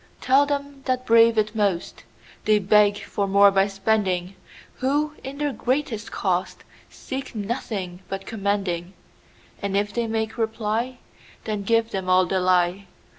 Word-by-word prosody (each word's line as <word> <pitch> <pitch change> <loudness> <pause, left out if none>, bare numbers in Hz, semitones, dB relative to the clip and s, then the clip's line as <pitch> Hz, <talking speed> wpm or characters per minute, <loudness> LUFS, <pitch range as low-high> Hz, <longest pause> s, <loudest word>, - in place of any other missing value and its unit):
Tell 275 +2 +4
them 285 -1 -3
that 255 0 0
brave 230 -1 +5
it 215 0 +1
most, 200 -6 -1 0.4
They 215 0 +5
beg 205 +1 +4
for 200 - -2
more 200 +1 +6
by 195 0 +3
spending, 195 -2 0 0.4
Who, 295 +3 0
in 270 +1 -7
their 290 -1 -1
greatest 245 -5 -2
cost, 185 -2 -2 0.3
Seek 265 -2 -7
nothing 200 -4 -4
but 195 0 -5
commending:And 200 -1 -4
if 205 0 -1
they 235 -1 -1
make 220 0 -2
reply, 225 +2 -1 0.5
Then 215 -2 -3
give 230 +2 +1
them 190 -1 -3
all 185 0 +5
the 190 +1 0
lie. 180 +1 +1
210 Hz, 140 wpm, -24 LUFS, 195-235 Hz, 0.5 s, more